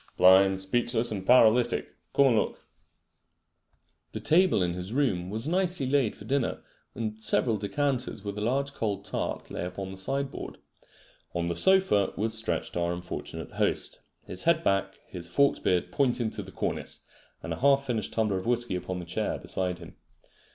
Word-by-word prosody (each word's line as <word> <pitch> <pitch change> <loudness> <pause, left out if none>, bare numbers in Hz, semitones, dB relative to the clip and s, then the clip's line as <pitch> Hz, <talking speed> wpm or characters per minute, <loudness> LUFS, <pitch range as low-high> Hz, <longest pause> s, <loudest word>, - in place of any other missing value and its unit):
"Blind, 95 +1 +6
speechless 120 +4 +1
and 95 -2 -5
paralytic. 120 -1 +4 0.2
Come 140 - +6
and 120 - +3
look." 105 - -1 1.5
The - - -4
table 175 - +3
in 85 -1 -1
his 90 +3 -6
room 115 -10 0
was 110 +6 -3
nicely 180 -3 0
laid 130 -4 +1
for 105 - -12
dinner, 135 0 -1 0.3
and 110 -1 -4
several 110 +1 +3
decanters 125 +1 -2
with 100 -1 -5
a 105 - -4
large 135 +5 0
cold 100 -5 -3
tart - - -4
lay - - -4
upon 95 +2 -5
the 95 - -9
sideboard. 135 +7 -3 0.8
On 85 0 0
the 85 0 -2
sofa 190 - +3
was 110 +2 +1
stretched 110 0 +1
our 85 0 0
unfortunate 90 0 -6
host, - - -1 0.2
his 90 - -6
head 165 0 +3
back, 95 0 0
his 85 -2 -8
forked 140 +10 +2
beard 90 -2 +1
pointing 125 -5 +1
to 105 - -3
the 95 -1 -10
cornice, - - -3 0.4
and - - -3
a - - -7
half 140 +1 +4
finished 115 -6 -2
tumbler 105 -4 0
of 95 - -5
whisky 120 -4 +1
upon 90 0 -4
the 90 - -6
chair 85 - -2
beside 90 -1 -2
him. 85 -1 -12
110 Hz, 170 wpm, -28 LUFS, 95-130 Hz, 1.5 s, Blind